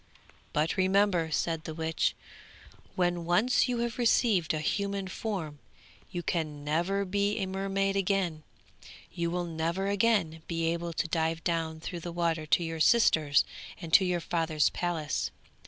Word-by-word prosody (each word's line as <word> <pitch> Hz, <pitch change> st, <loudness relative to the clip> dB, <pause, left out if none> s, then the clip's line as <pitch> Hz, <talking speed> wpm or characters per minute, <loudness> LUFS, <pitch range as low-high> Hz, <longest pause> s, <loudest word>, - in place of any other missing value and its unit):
'But 155 Hz, +2 st, 0 dB
remember,' 190 Hz, -3 st, +3 dB
said 160 Hz, 0 st, -1 dB
the 160 Hz, -, -5 dB
witch, 160 Hz, 0 st, 0 dB, 0.8 s
'when 175 Hz, -1 st, +1 dB
once 215 Hz, +11 st, +3 dB
you 245 Hz, -, 0 dB
have 235 Hz, +1 st, -3 dB
received 225 Hz, -7 st, +3 dB
a 155 Hz, -, 0 dB
human 200 Hz, +4 st, -1 dB
form, 185 Hz, -7 st, -4 dB, 0.5 s
you 175 Hz, -, -4 dB
can 155 Hz, -4 st, -2 dB
never 175 Hz, +7 st, 0 dB
be 200 Hz, +2 st, 0 dB
a 195 Hz, -, 0 dB
mermaid 195 Hz, +1 st, -1 dB
again; 190 Hz, -5 st, 0 dB, 0.7 s
you 170 Hz, -1 st, -1 dB
will 175 Hz, +1 st, -2 dB
never 170 Hz, +3 st, -2 dB
again 200 Hz, -6 st, +1 dB
be 165 Hz, -1 st, -1 dB
able 170 Hz, 0 st, -4 dB
to 165 Hz, -, -1 dB
dive 165 Hz, 0 st, -1 dB
down 165 Hz, -2 st, -1 dB
through 175 Hz, +1 st, -5 dB
the 175 Hz, +1 st, -6 dB
water 165 Hz, -2 st, -1 dB
to 160 Hz, +3 st, +3 dB
your 165 Hz, -1 st, -4 dB
sisters 155 Hz, -8 st, +4 dB, 0.3 s
and 165 Hz, -1 st, -8 dB
to 195 Hz, -, +8 dB
your 180 Hz, -2 st, 0 dB
father's 160 Hz, -3 st, +1 dB
palace. 170 Hz, -4 st, -2 dB
175 Hz, 155 wpm, -29 LUFS, 160-195 Hz, 0.8 s, to